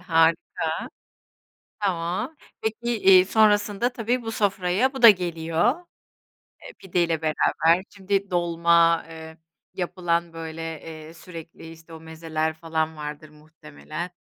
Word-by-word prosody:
harika. 165 -1 +1 0.9
Tamam, 190 - -2 0.2
peki, 235 +1 -2
iii, 190 -2 +7
sonrasında 210 +2 +2
tabii 245 +1 -1
bu 225 -1 -5
sofraya 200 +4 +1
bu 265 -2 -7
da 230 - +12
geliyor, 175 - 0 0.8
e, - - -12
pideyle 170 - -1
beraber. 165 +2 +2
Şimdi 195 -1 -2
dolma, 170 -1 +3
ııı, 160 0 -10 0.4
yapılan, 175 -2 -2
böyle, 165 0 -7 0.2
eee, 160 0 -10
sürekli, 165 -1 -11
işte, 165 0 -15
o 160 - -9
mezeler 160 0 -3
falan 160 0 -3
vardır 150 0 -7
muhtemelen. 155 +2 -9
170 Hz, 115 wpm, -24 LUFS, 160-195 Hz, 0.9 s, da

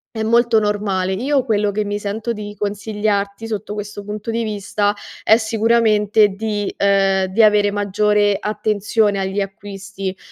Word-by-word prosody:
è 220 - -2
molto 235 0 +3
normale. 205 -3 -1
Io 265 +7 0
quello 210 -4 +1
che 210 +1 -1
mi 205 0 -3
sento 215 +3 -3
di 210 -2 -6
consigliarti 205 +1 -2
sotto 215 -1 -4
questo 210 0 -6
punto 210 +2 -5
di 230 +1 -1
vista 205 -1 -1 0.3
è 220 - +7
sicuramente 220 -2 +3
di, 205 0 -3
ehm, 195 -1 +2
di 200 +5 +2
avere 210 -1 +4
maggiore 205 0 +1
attenzione 210 0 0
agli 195 +1 -1
acquisti, 195 -1 -6
210 Hz, 145 wpm, -19 LUFS, 200-220 Hz, 0.3 s, è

